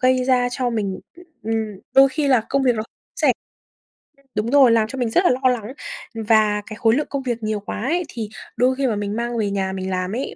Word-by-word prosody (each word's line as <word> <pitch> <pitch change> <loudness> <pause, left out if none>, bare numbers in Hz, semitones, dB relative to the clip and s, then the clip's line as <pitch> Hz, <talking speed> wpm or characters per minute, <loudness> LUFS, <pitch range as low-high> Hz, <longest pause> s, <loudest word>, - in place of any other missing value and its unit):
gây 255 0 +3
ra 250 -1 +3
cho 245 0 -1
mình, 205 -4 -2 0.4
ừm, 225 +1 -1 0.4
đôi 270 0 +8
khi 285 +1 -1
là 250 -5 +4
công 275 0 +1
việc 250 -2 +3
nó 215 - -1 0.3
sẽ - - +4 0.9
Ừm. 275 - -29
Đúng 215 +4 -1
rồi, 270 -4 +6
làm 220 -1 +3
cho 270 - -7
mình 245 -3 0
rất 350 +11 +3
là - - +4
lo 255 0 +2
lắng, 240 0 -2 0.4
và 215 -1 +2
cái 215 - -8
khối 225 +1 +3
lượng 295 - -1
công 275 -2 -3
việc 235 -3 -3
nhiều 215 -1 -1
quá 205 +1 -6
ấy, 340 +8 0
thì 220 -3 -5 0.3
đôi 255 +1 +3
khi 270 0 0
mà 220 - 0
mình 205 0 -3
mang 235 0 -2
về 210 -2 0
nhà 190 -1 -1
mình 190 0 -4
làm 185 +3 -2
ấy 265 - -4
235 Hz, 245 wpm, -21 LUFS, 215-260 Hz, 0.9 s, đôi